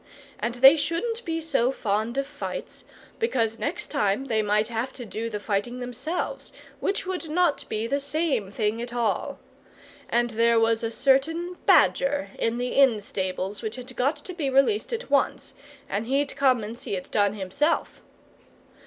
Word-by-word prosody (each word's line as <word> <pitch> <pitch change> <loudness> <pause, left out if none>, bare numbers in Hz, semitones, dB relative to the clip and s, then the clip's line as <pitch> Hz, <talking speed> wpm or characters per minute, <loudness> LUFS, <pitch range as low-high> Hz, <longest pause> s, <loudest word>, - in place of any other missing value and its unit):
And 235 +1 -2
they 270 +5 +8
shouldn't 450 +11 -1
be 330 -1 -1
so 275 -6 +1
fond 220 0 -1
of 275 - +1
fights, 290 +1 -7 0.3
because 230 - 0
next 340 +5 -3
time 215 -3 +1
they 225 -4 +1
might 210 +1 +2
have 235 +2 -2
to 245 - -8
do 225 +1 -4
the 210 -2 -4
fighting 210 +4 -2
themselves, 255 +8 -4 0.3
which 395 - -1
would 365 -3 -4
not 340 -1 +1
be 215 +1 -1
the 280 +4 0
same 285 - -1
thing 215 +2 -1
at 240 0 -6
all. 235 -2 -1 0.7
And 240 0 +1
there 230 +1 +3
was 225 0 +2
a 230 - 0
certain 280 +8 +1
badger 275 -8 +4
in 230 +1 0
the 245 +1 -1
inn 265 -6 +4
stables 190 0 -3
which 220 -1 -4
had 255 0 -9
got 275 +5 +1
to 305 +5 -8
be 310 -6 -2
released 275 - +2
at 475 +1 -4
once, - - +1 0.3
and 210 +3 -2
he'd 275 +2 0
come 260 -5 +3
and 215 +2 -6
see 220 - -4
it 180 - -7
done 205 -1 +2
himself. 215 - -1
245 Hz, 170 wpm, -26 LUFS, 220-290 Hz, 0.7 s, they